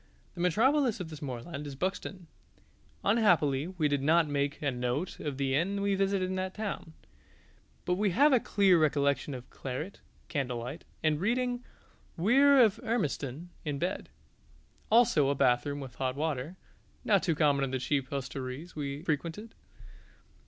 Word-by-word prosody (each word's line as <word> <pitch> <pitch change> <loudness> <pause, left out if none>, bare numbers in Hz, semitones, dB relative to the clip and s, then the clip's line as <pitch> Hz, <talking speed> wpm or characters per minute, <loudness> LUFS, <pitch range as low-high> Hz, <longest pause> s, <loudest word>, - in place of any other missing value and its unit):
The - - -6
metropolis 235 - +3
of 170 -3 -6
this 155 - -9
moorland 140 +3 -6
is 140 - -7
Buxton: 185 +2 -4 0.8
unhappily 165 - +3
we 175 -5 0
did 145 -1 0
not 160 +3 +4
make 145 0 -1
a 145 -2 0
note 125 +7 -2
of 145 -3 -4
the 135 -1 0
inn 185 +8 +1
we 200 0 +1
visited 195 -1 +1
in 185 - -3
that 185 0 -3
town; 200 -6 -5 0.9
but 180 - +1
we 205 0 +2
have 280 - +4
a 255 - +6
clear 195 -5 +3
recollection 145 -2 +1
of 125 -1 -9
claret, 140 +9 -6 0.3
candlelight, 125 0 -4 0.2
and 155 0 +1
reading 245 +3 0 0.5
"Weir 270 +10 +5
of 215 -1 +3
Hermiston" 175 - -3
in 150 -2 -2
bed; 175 +6 -3 0.8
also 215 - +4
a 140 - +1
bathroom 130 +3 +2
with 135 -3 -8
hot 130 0 -2
water, 150 +1 -2 0.5
not 200 -3 +4
too 165 -4 0
common 145 -2 +3
in 135 - -1
the 130 - -1
cheap 135 0 -1
hostelries 135 +3 -5
we 145 0 -4
frequented. 170 +7 -3
155 Hz, 155 wpm, -30 LUFS, 140-195 Hz, 0.9 s, a